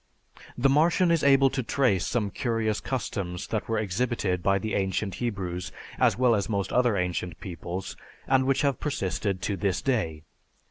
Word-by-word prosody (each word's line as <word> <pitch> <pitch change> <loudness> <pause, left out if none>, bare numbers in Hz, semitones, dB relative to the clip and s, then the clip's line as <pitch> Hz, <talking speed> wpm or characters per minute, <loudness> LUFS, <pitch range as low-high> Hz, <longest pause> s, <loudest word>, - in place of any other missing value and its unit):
The 130 - +3
Martian 170 +5 +3
is 165 -2 +2
able 135 -1 +5
to 130 - -1
trace 115 -6 +1
some 105 -5 -1
curious 110 -1 -1
customs 100 -8 -3
that 110 0 -2
were 115 - +1
exhibited 105 -2 -1
by 100 +2 +3
the 110 +2 -3
ancient 95 0 -1
Hebrews 90 -6 -3 0.3
as - - +3
well 125 -1 +4
as 100 -2 0
most 100 -2 -1
other 120 -4 +3
ancient 90 -2 -2
peoples, 90 0 -6 0.3
and 130 -1 +2
which 135 +2 +2
have 140 -3 +1
persisted 100 - -2
to 100 - 0
this 95 -2 0
day. 85 - -1
110 Hz, 170 wpm, -27 LUFS, 95-130 Hz, 0.3 s, able